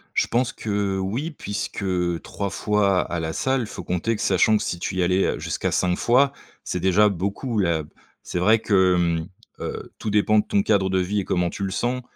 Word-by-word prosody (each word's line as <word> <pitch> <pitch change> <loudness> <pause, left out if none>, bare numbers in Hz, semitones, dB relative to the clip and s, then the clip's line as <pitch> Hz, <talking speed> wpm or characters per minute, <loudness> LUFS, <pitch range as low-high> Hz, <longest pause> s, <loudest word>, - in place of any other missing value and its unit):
Je - - +2
pense 125 +1 0
que, 110 - -7
heu, 100 -2 0
oui, 120 - -2
puisque 105 -6 -5 0.4
3 100 -1 -4
fois 100 -2 +2
à 85 - -3
la 80 0 -3
salle, 130 +8 0
il 110 - -4
faut - - -8
compter 90 +6 -1
que, - - -6
sachant 100 +3 +3
que - - -3
si - - -2
tu 95 - -4
y 95 - 0
allais, 90 +2 +2
heu, - - -1
jusqu'à - - -2
5 90 -1 +1
fois, 135 +4 +3 0.3
c'est 90 - -3
déjà 95 +3 +4
beaucoup, 100 +5 -2
heu, 85 -3 +1
b 75 - -15 0.3
c'est - - -5
vrai 110 +5 +4
que, 95 -4 +3
hem, 85 -2 0 0.3
heu, - - -6
tout 105 - -3
dépend 105 +1 +3
de - - 0
ton 100 - +2
cadre 100 -3 +2
de 95 0 +1
vie 100 +3 0
et - - -7
comment 90 0 0
tu 100 - -6
le 95 - -2
sens, 125 +6 -1
100 Hz, 230 wpm, -23 LUFS, 90-110 Hz, 0.4 s, déjà